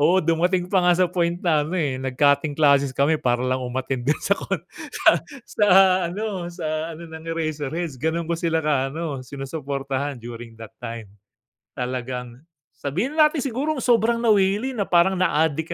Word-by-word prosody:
Oo, 165 +6 +4
dumating 175 +2 +2
pa 190 - +5
nga 175 -1 +4
sa 185 - +4
point 170 -1 0
na 155 -3 +3
ano, 155 +5 -3
eh, 135 -6 -1
nag-cutting 140 +2 +1
classes 140 -2 +4
kami 150 +3 +2
para 125 0 +1
lang 130 0 0
umattend 130 +1 -3
dun 150 - +3
sa 200 - +2
kuwan, - - -2 0.3
sa - - +1 0.4
sa 210 - 0 0.4
ano 195 -2 -4
sa 160 -2 -4
ano, 170 - -10
ng 160 -1 -10
Eraserheads. 155 -2 -3
Gano'n 160 +2 -1
ko 170 - -3
sila 165 -1 0
ka 135 -3 +1
ano, 150 -1 -4
sinusuportahan 140 0 -4
during 120 -1 -9
that 115 0 -11
time. 115 -4 -7 0.6
Talagang 125 -1 -4 0.3
sabihin 195 - -3
na 310 - +7
natin 300 -2 -3
sigurong 275 +4 -2
sobrang 235 -1 +2
nawili 210 +3 +2
na 200 - 0
parang 185 +2 +3
na-adik 160 -2 +1
155 Hz, 170 wpm, -23 LUFS, 135-180 Hz, 0.6 s, na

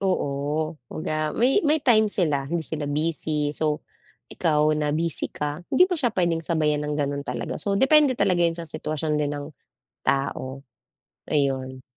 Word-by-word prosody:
Oo, 155 -3 -1
kumbaga 155 -1 -3
may 260 - +3
may 300 0 +2
time 220 -4 +4
sila, 150 -9 +1
hindi 165 +2 -2
sila 150 -2 -4
busy. 150 -1 0
So, 150 0 +1 0.5
ikaw 150 -1 +2
na 150 -1 0
busy 165 0 +1
ka, 150 +2 -4
hindi 365 +7 +5
mo 360 - -1
siya 240 -6 +1
puwedeng 170 -3 0
sabayan 150 -3 0
ng 150 0 -2
gano'n 140 -1 -2
talaga. - - -4
So 200 - +2
depende 280 +2 +5
talaga 185 -6 +1
'yan 165 0 +1
sa 170 -1 -5
sitwasyon 155 0 -2
din 145 0 -1
ng 145 0 -5 0.6
tao, 135 0 -2 0.7
ayun. 130 -3 -1
155 Hz, 160 wpm, -24 LUFS, 145-175 Hz, 0.7 s, hindi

